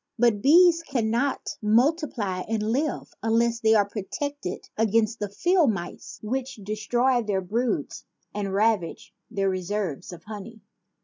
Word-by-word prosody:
But 230 -3 +3
bees 335 - +6
cannot 245 -2 -1
multiply 230 - +1
and 220 0 -1
live 285 +4 -2
unless 230 +1 +2
they 220 -1 +4
are 205 -2 +4
protected 225 +3 -5
against 225 +1 +1
the 205 - -3
field 345 - +3
mice 175 -3 -7
which 260 +4 -3
destroy 230 +5 0
their 205 -4 -1
broods 230 +7 -2 0.3
and 200 -2 -3
ravage 200 -3 0 0.2
their 200 -4 -1
reserves 185 -4 -3
of 170 -2 -11
honey. 215 +1 -9
220 Hz, 130 wpm, -25 LUFS, 205-250 Hz, 0.3 s, bees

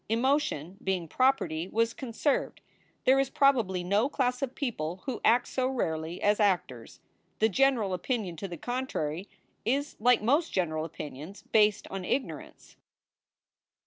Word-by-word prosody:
Emotion, 230 - 0
being 185 -3 -1
property, 180 - +1
was 230 +3 +1
conserved. 265 +2 -1 0.4
There 265 +1 +5
is 270 -1 +1
probably 230 -12 +2
no 205 +8 +2
class 250 -3 0
of 265 -2 -3
people 185 - -3
who 260 -4 -4
act 240 +2 +4
so 255 -1 0
rarely 165 -9 -2
as 205 +1 +3
actors. 175 - -1 0.4
The 220 - +3
general 235 -4 +2
opinion 195 -2 -2
to 195 - -5
the 175 -2 -7
contrary 195 - -3 0.3
is 280 +5 -1
like 240 0 +4
most 290 +9 +2
general 155 -4 -1
opinions 155 +4 -8
based 210 -1 +3
on 195 -1 -4
ignorance. 260 +8 -4
215 Hz, 140 wpm, -29 LUFS, 180-260 Hz, 0.4 s, There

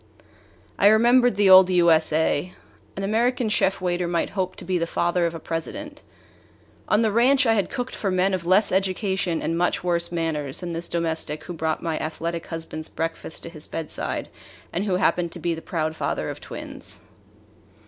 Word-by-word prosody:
I 200 - +6
remembered 240 +2 +5
the 200 -1 +4
old 185 0 +9
U. 175 -2 +4
S. 160 0 +3
A. 160 +2 0 0.4
An 195 - -3
American 235 +3 +1
chef 195 -2 +1
waiter 180 -1 -1
might 170 -1 -1
hope 185 -2 -2
to - - -9
be 180 0 0
the 170 - -1
father 175 +1 +1
of 165 - -5
a - - -6
President. 295 - -5 0.9
On 210 +2 +3
the 220 - +2
ranch 260 +5 +4
I 225 - +4
had 200 -5 0
cooked 245 +1 -4
for 200 - -2
men 185 +1 +1
of 185 -2 -1
less 190 +4 +4
education 190 -2 0
and 165 - -1
much 175 +1 0
worse 170 -1 +2
manners 160 -5 -2
than 175 -1 -4
this 170 +1 -3
domestic 160 -2 -2
who 175 - -7
brought 160 -1 -2
my 165 -2 -2
athletic 165 +1 -4
husband's 160 -1 -6
breakfast 165 -1 -4
to - - -6
his 155 -2 -9
bedside 160 -2 -4 0.4
and 185 +4 -1
who 190 -3 +1
happened 175 -2 +1
to 175 - -6
be 170 +1 -1
the 165 - -6
proud 160 -2 -2
father - - -2
of - - -10
twins. - - -7
175 Hz, 190 wpm, -24 LUFS, 165-195 Hz, 0.9 s, old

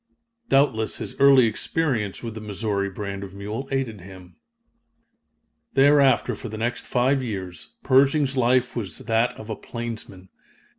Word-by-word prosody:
Doubtless 135 -6 +2
his - - -6
early 135 -2 +7
experience 115 -2 -1
with 115 -2 -5
the 110 - -8
Missouri 100 -1 -2
brand 100 0 -6
of 95 0 -9
mule 105 +7 -5
aided 125 -7 -2
him. 90 -1 -13 1.4
Thereafter, 140 -2 +4
for 120 - -7
the 110 - -6
next 120 +2 -3
five 130 +2 +2
years, 95 -7 -6
Pershing's 140 +1 +3
life 125 0 +2
was 100 -9 -4
that 115 +2 0
of 110 +1 -9
a - - -2
plainsman. 110 -6 -7
115 Hz, 140 wpm, -24 LUFS, 100-130 Hz, 1.4 s, early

